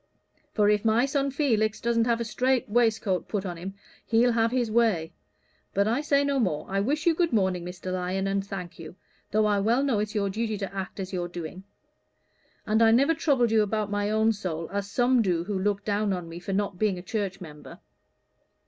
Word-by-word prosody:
For 210 -2 +3
if 210 -1 +2
my 225 +3 +3
son 275 0 0
Felix 225 -7 +1
doesn't 230 0 +1
have 235 -1 +1
a 235 - -2
strait 255 +3 0
waistcoat 220 -4 +1
put 205 -2 -3
on 175 -2 -4
him, 190 +4 -7 0.3
he'll 235 +1 +4
have 230 0 +2
his 240 -2 -1
way. 215 -9 +1 0.6
But 200 +1 +2
I 235 +6 +1
say 285 -2 +2
no 280 -1 0
more. 180 -11 0
I 195 +1 -1
wish 290 +10 -1
you 340 - +5
good 335 0 +1
morning, 190 -5 +1
Mr. 180 +1 -6
Lyon, 185 +1 -2
and 195 0 0
thank 180 -4 -7
you, 165 +1 -9 0.3
though 215 +1 +2
I 205 -1 +2
well 230 +7 +2
know 260 -7 +1
it's 210 +1 -3
your 200 -2 0
duty 220 +1 -2
to 195 -1 -5
act 195 +1 -5
as 190 0 -5
you're 175 -1 -2
doing. 175 +2 -8 1.0
And 220 +2 +2
I 225 - +6
never 270 +8 +4
troubled 275 -8 +1
you 220 -1 +4
about 210 0 -1
my 205 0 0
own 220 +1 +2
soul, 170 -5 -4
as 200 0 -3
some 245 +2 +3
do 175 -5 0
who 195 +1 -3
look 200 +1 -1
down 205 -1 0
on 180 -2 -4
me 165 +1 -8
for 180 - -6
not 195 -2 -1
being 210 -4 +1
a 180 - -8
church 195 -1 -3
member." 150 -5 -11
210 Hz, 215 wpm, -26 LUFS, 190-230 Hz, 1.0 s, I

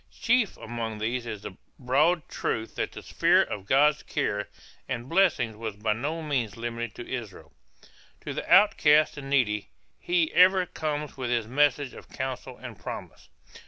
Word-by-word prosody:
Chief 235 -3 +2
among 115 -1 -5
these 120 +3 -2
is 105 -3 -6
the 95 - -8 0.2
broad 150 +7 +2
truth 110 0 -3
that - - -3
the - - -9
sphere - - +3
of 100 -2 -6
God's 150 +4 +4
care 105 -9 -2 0.4
and 125 -1 -3
blessing 145 - +2
was 110 -3 -4
by 105 +1 0
no 150 +9 -3
means 125 -8 -2
limited 115 -1 -4
to 120 - -8
Israel. 115 -7 -7 0.7
To - - -5
the - - -5
outcast 155 -6 +5
and 135 -1 -7
needy 110 -7 +1 0.3
he 175 -2 +1
ever 185 +1 +6
comes 150 -3 -4
with 125 -2 -3
his 120 -2 0
message 140 +2 +1
of - - -13
counsel 130 -1 -5
and 125 -5 -10
promise. - - -8
130 Hz, 160 wpm, -27 LUFS, 115-150 Hz, 0.7 s, ever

